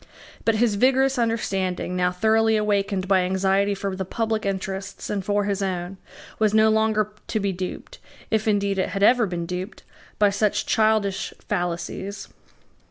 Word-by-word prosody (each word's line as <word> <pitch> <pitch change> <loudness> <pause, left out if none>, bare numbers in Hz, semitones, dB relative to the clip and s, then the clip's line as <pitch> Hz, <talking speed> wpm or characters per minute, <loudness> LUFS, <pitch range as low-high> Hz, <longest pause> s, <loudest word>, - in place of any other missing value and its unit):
But 225 - +3
his 225 -1 +2
vigorous 265 0 +3
understanding, 195 -6 -1
now 180 0 +1
thoroughly 220 +4 +2
awakened 200 -2 0
by 190 -1 +4
anxiety 190 +2 +1
for 195 -1 -3
the 190 - -3
public 220 +2 -2
interests 195 0 -4
and 200 -2 -2
for 205 +1 +1
his 200 0 -1
own, 185 -1 -3 0.4
was 215 -1 +2
no 220 0 +5
longer 215 -1 +1
to 220 - -1
be 200 -1 0
duped, 185 0 -6 0.3
if 220 0 +1
indeed 200 -2 +1
it 190 - -1
ever 240 +1 +5
had - - -6
been 170 -1 -3
duped, 180 +4 -6 0.3
by 205 -1 +4
such 205 +1 0
childish 215 -3 +1
fallacies. 180 +1 -3
200 Hz, 160 wpm, -24 LUFS, 190-220 Hz, 0.4 s, no